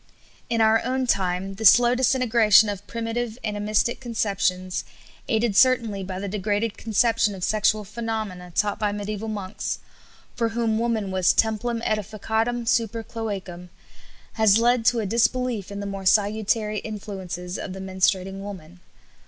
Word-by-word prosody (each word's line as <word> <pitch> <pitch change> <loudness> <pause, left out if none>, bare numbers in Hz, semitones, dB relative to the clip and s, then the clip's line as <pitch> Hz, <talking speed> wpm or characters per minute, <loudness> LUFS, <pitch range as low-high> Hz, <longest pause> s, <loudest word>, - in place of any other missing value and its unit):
In 230 -1 +1
our 220 0 +4
own 260 +1 -1
time 190 -3 0
the 220 - -6
slow 240 +3 +7
disintegration 235 -4 +4
of 205 0 -6
primitive 230 0 -3
animistic 210 +2 0
conceptions, 195 -6 -1 0.4
aided 220 -3 +1
certainly 230 -5 +3
by 185 0 -5
the 200 +2 -4
degraded 205 +2 -1
conception 225 -1 +1
of 185 - -8
sexual 215 +1 +2
phenomena 215 -4 -5
taught 205 -1 0
by 210 -1 0
mediæval 210 +1 -4
monks 205 -1 -4 0.6
for 230 -1 0
whom 225 -1 0
woman 225 -4 -1
was 185 -1 +3
"templum 225 +1 0
ædificatum 220 +3 -2
super 230 -1 0
cloacam" 195 -6 -6 0.6
has 220 -2 +4
led 240 0 +2
to 240 -1 +3
a - - -3
disbelief 235 -1 0
in 200 0 -5
the - - -5
more 195 -1 -4
salutary 210 +1 +2
influences 190 -4 -6
of 185 - -6
the 190 - -8
menstruating 190 0 0
woman. 185 -4 -9
215 Hz, 145 wpm, -24 LUFS, 195-230 Hz, 0.6 s, slow